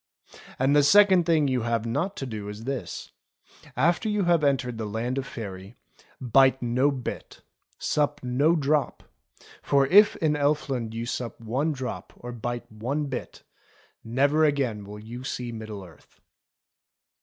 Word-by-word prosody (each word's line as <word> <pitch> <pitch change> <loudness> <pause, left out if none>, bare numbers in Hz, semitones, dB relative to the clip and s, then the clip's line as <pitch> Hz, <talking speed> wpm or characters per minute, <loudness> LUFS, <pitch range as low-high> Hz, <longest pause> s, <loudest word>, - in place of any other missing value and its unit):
And 135 +3 +2
the 145 - +6
second 185 +2 +6
thing 155 -4 +3
you 130 -2 0
have 115 -1 -1
not 175 - -2
to 135 - -4
do 105 -4 -6
is 105 +2 -8
this: 125 -7 -5 0.7
after 170 - +2
you 210 -1 +1
have 170 -3 +3
entered 130 -4 0
the 110 - -3
Land 120 +5 -2
of 135 - -5
Faery, 100 0 -8 0.4
bite 130 +1 +4
no 125 +3 +2
bit, 130 -4 -6 0.3
sup 145 0 0
no 140 +7 +2
drop; 150 -1 0 0.6
for 140 -1 +3
if 205 +9 +6
in 155 -2 +1
Elfland 140 -6 -1
you 115 +1 -3
sup 120 -1 -4
one 130 +8 -1
drop 130 -3 -6
or 120 - -8
bite 120 0 -4
one 125 +8 -2
bit, 130 - -6 0.6
never 140 +7 +2
again 130 -9 0
will 105 +1 -9
you 115 +4 -9
see 125 -2 -4
Middle 110 -3 -7
Earth." 80 -5 -19
130 Hz, 155 wpm, -26 LUFS, 115-145 Hz, 0.7 s, the